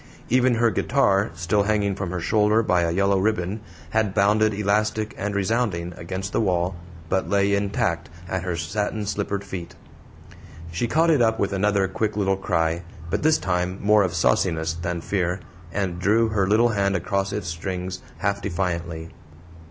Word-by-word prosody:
Even 125 0 +3
her 115 0 +3
guitar, 105 -8 +2
still 85 +5 +1
hanging 100 -1 +1
from 95 -1 -4
her 90 0 -3
shoulder 105 +5 +3
by 90 -4 +2
a 85 - +1
yellow 100 +2 +2
ribbon, 100 0 0 0.3
had 110 -3 +1
bounded 105 +1 +4
elastic 105 +1 0
and 100 +1 -3
resounding 100 -4 0
against 95 +4 -5
the - - +2
wall, 90 -2 0 0.3
but 95 +2 0
lay 100 0 +2
intact 100 -4 0 0.2
at 95 0 -2
her 90 -1 -2
satin 105 +6 -2
slippered 100 0 -2
feet. 95 -4 -7 1.0
She 90 +8 -1
caught 165 +7 +3
it 145 -6 +3
up 110 -1 +3
with 100 -1 0
another 100 0 +2
quick 105 +2 -2
little 95 -2 +2
cry, 85 -3 0 0.3
but 100 - 0
this 155 +1 +4
time 90 0 -1
more 105 +1 +4
of 95 -3 0
sauciness 80 -3 +1
than 85 0 -3
fear, 90 0 -1 0.3
and 90 -2 -2
drew 110 +5 +3
her 100 -3 +1
little 110 +4 +4
hand 100 -3 +1
across 95 +2 -1
its 105 -2 -3
strings, 90 +2 -4 0.2
half 100 -1 -1
defiantly. 85 -3 -3
100 Hz, 165 wpm, -24 LUFS, 90-105 Hz, 1.0 s, bounded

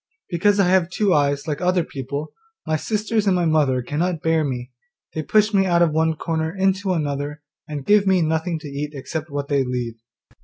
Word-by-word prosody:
Because 200 +4 +2
I 195 - +4
have 185 -2 +3
two 195 0 +1
eyes 140 0 +1
like 150 +1 -2
other 180 -1 +2
people, 140 +1 -6 0.3
my 155 - 0
sisters 215 +4 -1
and 190 - +4
my 175 -1 +1
mother 145 -6 +2
cannot 160 +5 -2
bear 160 -1 +2
me; 125 -3 -4 0.4
they 160 - -2
push 215 +6 +2
me 195 -1 +3
out 170 -1 +4
of 165 - +2
one 160 +1 +1
corner 160 0 -2
into 190 0 +1
another, 145 -2 -3 0.2
and 145 -3 -5
give 205 -1 +4
me 185 -3 +4
nothing 160 +2 0
to 155 - -8
eat 145 +1 -5
except 155 +3 -5
what 140 0 -3
they 140 -2 +2
leave. 125 -2 -3
160 Hz, 200 wpm, -22 LUFS, 145-185 Hz, 0.4 s, I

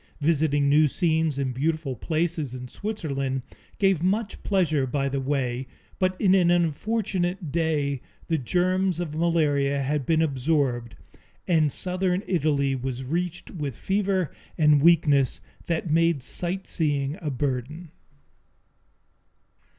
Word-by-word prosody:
Visiting 145 -2 +2
new 150 +2 +5
scenes 160 -2 +1
and 135 -2 -1
beautiful 155 0 -1
places 155 -2 -1
in 125 0 -7
Switzerland 140 - -3 0.3
gave 195 -5 +2
much 200 +4 -1
pleasure 155 -9 +1
by 140 +2 -1
the 140 0 -1
way, 130 -2 -1 0.3
but 185 0 0
in 190 -2 +4
an 180 -3 +4
unfortunate 175 0 0
day 145 -4 0 0.2
the 165 -2 0
germs 180 +5 +1
of 170 -4 -3
malaria 145 -4 +1
had 145 +1 -1
been 160 0 +3
absorbed 135 -5 0 0.5
and 155 -4 +3
southern 185 +3 -1
Italy 145 -5 +1
was 130 0 -4
reached 175 +5 -3
with 145 -8 -5
fever 190 -3 0 0.3
and 150 -2 +5
weakness 145 -5 +4 0.3
that 165 -1 -1
made 165 -3 +2
sightseeing 155 -5 -1
a 155 - -2
burden. 145 +5 -3
155 Hz, 120 wpm, -25 LUFS, 140-175 Hz, 0.5 s, new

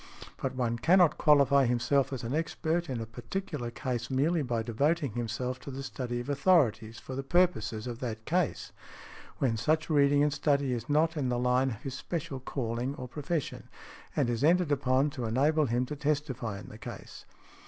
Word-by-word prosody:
But 130 -1 -2
one 120 -2 -1
cannot 170 +2 +4
qualify 140 -3 +5
himself 125 +3 +1
as 130 -3 -4
an 115 +3 -3
expert 165 +1 -1
in 125 -3 -2
a 115 - -4
particular 120 - -5
case 125 -1 -4
merely 150 +5 +1
by 120 -4 -1
devoting 140 +5 0
himself 120 +3 -3
to - - -9
the 135 0 -6
study 125 -2 -4
of 120 - -6
authorities 140 - +2
for 130 - -8
the 135 - -2
purposes 135 - +1
of 120 -2 -5
that 110 -3 -5
case, 175 -1 -1 0.7
when 115 -4 +1
such 155 +7 0
reading 145 -1 +4
and 150 -1 +2
study 140 -2 +1
is 120 +1 -5
not 160 +3 +2
in 140 -5 -1
the 120 - 0
line 125 +2 +2
of 110 -4 -7
his 135 - -4
special 145 -1 -4
calling 125 0 -3
or 125 - -7
profession 150 +3 -4 0.5
and - - +2
is 120 +2 -1
entered 170 0 +3
upon 135 +1 +2
to 130 -5 -4
enable 145 +6 +2
him 120 +2 0
to 150 - -5
testify 140 -7 -2
in - - -11
the 110 - -11
case. - - -9
135 Hz, 185 wpm, -30 LUFS, 120-150 Hz, 0.7 s, qualify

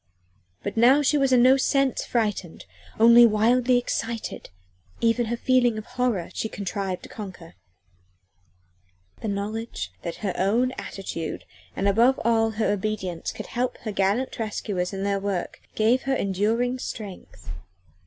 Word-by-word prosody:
But - - -4
now 260 +6 +6
she 290 - +2
was 275 -2 +2
in 245 -1 +5
no 260 +2 +6
sense 275 0 +1
frightened, 210 -7 -2 0.3
only 235 +1 +8
wildly 240 +4 +3
excited; 230 -2 -3 0.5
even 230 0 +2
her 235 +1 -2
feeling 245 -2 +2
of 215 - -6
horror 240 -10 -1
she 220 - -3
contrived 195 -2 -4
to - - -10
conquer. 185 -6 -9 1.7
The - - -3
knowledge 205 - -4
that 170 - -5
her 190 - 0
own 225 +7 +1
attitude, 190 -9 -6 0.3
and 195 - 0
above 235 +6 +4
all 225 -1 +3
her 220 -1 0
obedience, 190 -4 -3
would - - -6
help 250 +1 -2
her 220 - -4
gallant 200 +7 0
rescuers 205 -4 -2
in 195 -1 -4
their 200 0 0
work 195 -3 -3
gave 230 +4 +3
her 270 0 0
enduring 225 +5 0
strength. 185 - -8
220 Hz, 145 wpm, -25 LUFS, 195-245 Hz, 1.7 s, only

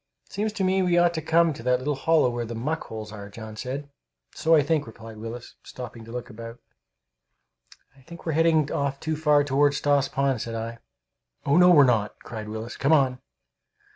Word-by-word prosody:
"It - - -22
seems 210 +2 -1
to 200 - -2
me 190 +1 +2
we 175 -1 +2
ought 175 0 +4
to 160 - -3
come 165 +1 +3
to 135 - -10
that 125 +1 +2
little 140 +4 -2
hollow 145 -1 +2
where 120 0 -3
the 115 0 -6
muck 150 +8 -3
holes 110 -1 -7
are," 100 -2 -9
John 110 +1 -9
said. 135 +5 -5 0.5
"So 165 +1 +3
I 150 - +4
think," 145 -2 0
replied 115 0 -11
Willis, 115 +2 -8
stopping 120 -2 -9
to 115 - -11
look 125 0 -5
about. 115 0 -9 1.4
"I 135 - -21
think 170 +5 -13
we're 165 - 0
heading 160 -2 +2
off 140 -1 -1
too 160 +1 -2
far 150 -1 +3
toward 145 +1 +2
Stoss 145 -1 +2
Pond," 135 -4 0
said 115 -1 -5
I. 115 +1 -5 0.7
"Oh 140 - +3
no, 180 +1 +7
we're 155 -5 +8
not!" 115 -5 +1
cried 110 -2 -7
Willis. 110 +2 -6
"Come 140 +3 +2
on!" 130 -4 +3
135 Hz, 205 wpm, -25 LUFS, 115-160 Hz, 1.4 s, we're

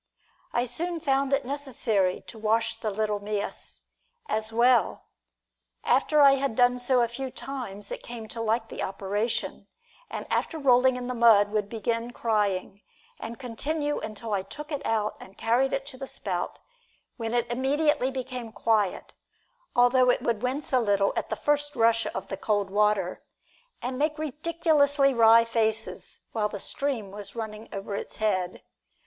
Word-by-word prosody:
I 240 - +1
soon 335 +8 -3
found 275 -2 +1
it 275 -1 +1
necessary 245 -9 0
to 225 - -12
wash 225 +1 +1
the 215 - -2
little 210 0 -1
mias 205 0 -5 0.4
as 220 - -2
well. 240 +2 +3 0.8
After 300 -1 +3
I 280 -1 +9
had 270 -4 -1
done 245 0 +4
so 245 0 +3
a 235 - +3
few 260 +3 -5
times 235 -7 -7
it - - -5
came 235 -2 -7
to 230 - -5
like 225 +1 0
the - - -6
operation, 205 +4 -2 0.4
and - - -5
after 325 - 0
rolling 260 -3 +4
in 250 0 -4
the 250 - -3
mud 225 -4 +5
would 210 -1 -1
begin 230 +1 -2
crying, 205 -4 -1 0.4
and 230 +1 -6
continue 290 +4 -2
until 215 0 -5
I 195 - +1
took 295 +11 -9
it 290 - -3
out 215 -1 0
and 190 - -13
carried 240 +4 +2
it 270 - -2
to 275 -2 -9
the 270 - -5
spout, - - -3 0.6
when 230 0 -2
it 240 0 0
immediately 270 +2 +1
became 255 -3 -5
quiet, 215 -4 0 0.6
although 250 +1 +5
it - - +2
would 230 -3 0
wince 265 +3 -2
a 255 - +5
little 200 -3 +2
at - - -2
the - - -1
first 290 0 0
rush 230 0 +3
of - - -4
the 195 - -5
cold 205 -1 0
water, 205 -3 +1 0.6
and 255 +1 -3
make 305 +1 +1
ridiculously 300 -2 +2
wry 230 -1 +6
faces 225 -1 -1
while 210 -2 0
the 205 - -5
stream 230 -2 -2
was 200 0 -9
running 220 -1 -6
over 200 +1 -5
its 200 - -4
head. 185 -4 -1
235 Hz, 165 wpm, -27 LUFS, 215-265 Hz, 0.8 s, I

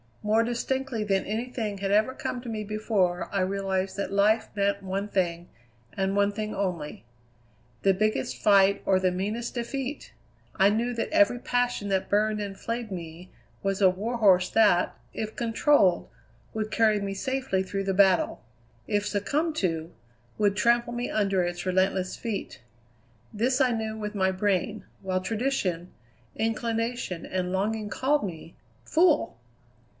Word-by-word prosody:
More 215 +2 +3
distinctly 245 0 -2
than 195 -2 0
anything 220 -1 -3
had 195 0 -1
ever 215 +5 +3
come 250 - -4
to 245 - -7
me 215 -1 -3
before 200 -4 0
I 195 - 0
realized 190 0 -1
that 200 - -3
life 215 +3 +3
meant 200 0 +1
one 195 +1 -3
thing, 175 -3 -1 0.4
and 195 0 -1
one 200 0 +3
thing 215 +1 -4
only: 175 -10 -3 0.8
the 195 - +5
biggest 185 -11 0
fight 200 -1 +5
or 190 -1 +3
the 185 -1 +2
meanest 210 +7 -3
defeat! 265 +3 -4 0.4
I 195 +1 +5
knew 235 +4 0
that 230 - -2
every 305 -6 +4
passion 245 -4 -1
that 190 -1 0
burned 210 +1 +2
and 200 -2 -5
flayed 230 -2 -4
me 170 0 -8 0.3
was 195 -1 -1
a 190 - +7
warhorse 195 -2 +2
that, 210 -5 +4 0.2
if 220 0 -4
controlled, 225 - +3 0.5
would 215 -1 -3
carry 215 -2 +3
me 200 -1 -3
safely 260 -3 -1
through 195 +1 -3
the 195 0 0
battle; 190 -1 +3 0.4
if 205 0 0
succumbed 295 - -1
to, 165 -3 -1 0.5
would 205 -2 +2
trample 235 +2 +2
me 240 +1 -3
under 195 -3 +1
its 175 0 -3
relentless 185 0 +1
feet. 210 - -5 0.7
This 245 +5 +1
I 260 -2 +4
knew 220 -1 -2
with 210 -1 -5
my 190 -1 +2
brain, 200 +2 -1 0.2
while 185 -1 -1
tradition, 195 -6 -1 0.4
inclination, 225 -3 -2
and 185 -1 -2
longing 210 +3 -1
called 285 +5 +1
me 170 -3 -7 0.3
fool! 320 - +2
205 Hz, 150 wpm, -27 LUFS, 190-230 Hz, 0.8 s, a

